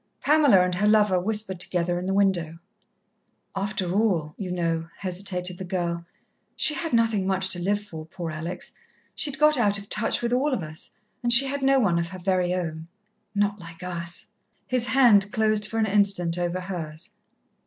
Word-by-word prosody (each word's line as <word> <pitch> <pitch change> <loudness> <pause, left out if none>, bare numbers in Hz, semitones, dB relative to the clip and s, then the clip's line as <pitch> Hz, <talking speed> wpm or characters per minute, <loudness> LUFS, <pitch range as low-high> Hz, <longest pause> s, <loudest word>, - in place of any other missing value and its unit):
Pamela 285 -11 +5
and 180 - -2
her 200 +4 +1
lover 210 -3 +4
whispered 210 -1 -1
together 175 0 -1
in 180 - -5
the 195 - 0
window. 175 -5 +1 1.0
"After 195 -2 -2
all, 185 -8 +1
you 185 -3 -5
know," 165 -2 -2
hesitated 180 -1 -4
the - - -4
girl, 170 -2 -3 0.5
"she 305 - +3
had 330 +1 -3
nothing 225 -5 +2
much 190 0 0
to 180 - -3
live 205 +3 0
for, 160 -6 -9
poor 165 0 -6
Alex. 160 +3 -6 0.4
She'd 285 -3 -1
got 300 -1 +4
out 205 -3 +2
of 200 0 -10
touch 215 +2 0
with 235 0 0
all 265 +2 +1
of 190 - -4
us 155 +1 -8 0.3
and 240 - 0
she 240 +3 +9
had 280 +1 -3
no 270 0 +4
one 180 -8 +2
of 170 - -2
her 185 +2 -9
very 180 -1 0
own." 165 -3 -3 0.5
"Not 205 0 0
like 170 0 -11
us." 170 -1 -5 0.4
His 250 -1 0
hand 210 -7 +5
closed 215 -1 +2
for 225 - -4
an 220 - +2
instant 195 -5 +2
over 175 +1 -2
hers. 170 -3 -6
190 Hz, 185 wpm, -25 LUFS, 175-215 Hz, 1.0 s, she